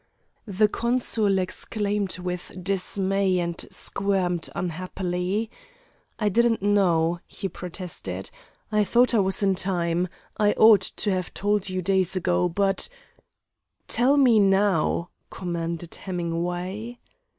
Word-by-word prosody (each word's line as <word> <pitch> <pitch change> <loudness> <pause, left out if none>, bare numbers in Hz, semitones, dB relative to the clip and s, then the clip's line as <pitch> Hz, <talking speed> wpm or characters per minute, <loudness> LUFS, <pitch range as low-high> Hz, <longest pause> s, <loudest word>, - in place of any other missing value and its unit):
The 210 +1 +3
consul 230 -3 0
exclaimed 200 +1 -2
with 180 -1 -5
dismay 195 0 0
and 170 -1 -1
squirmed 185 -4 -1
unhappily. 180 +4 -2 0.7
"I 210 - 0
didn't 225 +1 +2
know," 175 -5 +2
he 195 - -5
protested. 180 -1 -6 0.4
"I 210 0 +3
thought 240 +4 +3
I 225 - +4
was 195 +1 +1
in 195 -1 +4
time. 180 -2 0 0.3
I 210 -1 +3
ought 220 -3 +7
to 205 +2 -2
have 185 -2 -3
told 205 -1 0
you 185 0 -2
days 190 0 +1
ago, 180 -1 +1
but 195 +2 0 0.5
" - - -53
"Tell 265 +4 +4
me 250 -6 +5
now," 195 -4 +2 0.2
commanded 170 -2 -4
Hemingway. 180 +5 -4
190 Hz, 115 wpm, -25 LUFS, 180-205 Hz, 0.7 s, ought